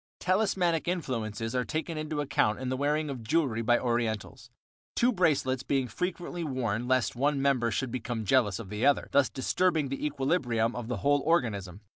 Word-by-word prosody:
Talismanic 185 Hz, -4 st, +1 dB
influences 115 Hz, -, -2 dB
are 125 Hz, -1 st, +1 dB
taken 160 Hz, +4 st, -3 dB
into 155 Hz, -1 st, -3 dB
account 110 Hz, -6 st, +1 dB
in 130 Hz, -1 st, -3 dB
the 130 Hz, -, 0 dB
wearing 150 Hz, +3 st, 0 dB
of 130 Hz, -3 st, -6 dB
jewelry 125 Hz, -2 st, +1 dB
by 120 Hz, +1 st, +3 dB
Orientals, 115 Hz, -3 st, -2 dB, 0.5 s
two 245 Hz, +1 st, +3 dB
bracelets 145 Hz, -, +1 dB
being 135 Hz, -1 st, 0 dB
frequently 175 Hz, +3 st, -4 dB
worn 125 Hz, -5 st, -2 dB
lest 130 Hz, -2 st, +1 dB
one 140 Hz, +3 st, +1 dB
member 135 Hz, -4 st, +2 dB
should 125 Hz, +3 st, -2 dB
become 115 Hz, -2 st, -3 dB
jealous 105 Hz, -5 st, +3 dB
of 110 Hz, -5 st, -8 dB
the 105 Hz, +3 st, -4 dB
other, 140 Hz, +1 st, +3 dB
thus 140 Hz, -1 st, +4 dB
disturbing 155 Hz, +2 st, 0 dB
the 135 Hz, -, -4 dB
equilibrium 135 Hz, -6 st, 0 dB
of 120 Hz, -2 st, -5 dB
the 125 Hz, -2 st, -2 dB
whole 145 Hz, +7 st, +2 dB
organism. 105 Hz, -, 0 dB
130 Hz, 175 wpm, -29 LUFS, 115-155 Hz, 0.5 s, thus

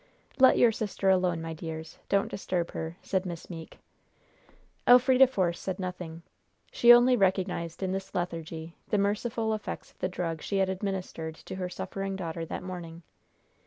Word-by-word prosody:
"Let 260 Hz, 0 st, +7 dB
your 240 Hz, -, +6 dB
sister 205 Hz, -3 st, 0 dB
alone, 180 Hz, -3 st, +1 dB
my 165 Hz, 0 st, -4 dB
dears. 160 Hz, 0 st, -7 dB
Don't 200 Hz, 0 st, +2 dB
disturb 180 Hz, -3 st, -2 dB
her," 160 Hz, +2 st, -5 dB
said 190 Hz, -2 st, 0 dB
Miss 175 Hz, -1 st, -7 dB
Meeke. 165 Hz, -2 st, -9 dB, 1.1 s
Elfrida 255 Hz, +1 st, +7 dB
Force 185 Hz, -9 st, 0 dB
said 190 Hz, -, -3 dB
nothing. 180 Hz, -3 st, -6 dB, 0.5 s
She 240 Hz, -, +7 dB
only 245 Hz, +1 st, +7 dB
recognized 185 Hz, -4 st, 0 dB
in 185 Hz, -, 0 dB
this 195 Hz, 0 st, -5 dB
lethargy 165 Hz, -2 st, -4 dB
the 210 Hz, -, +1 dB
merciful 220 Hz, +2 st, 0 dB
effects 215 Hz, -, -5 dB
of -, -, -33 dB
the 185 Hz, -, -1 dB
drug 165 Hz, -3 st, -3 dB
she 200 Hz, -, -2 dB
had 190 Hz, -1 st, +2 dB
administered 185 Hz, -4 st, -4 dB
to -, -, -10 dB
her 185 Hz, -1 st, -3 dB
suffering 195 Hz, +2 st, -4 dB
daughter 165 Hz, -3 st, -4 dB
that -, -, -5 dB
morning. 175 Hz, -2 st, -7 dB
185 Hz, 160 wpm, -29 LUFS, 165-200 Hz, 1.1 s, Let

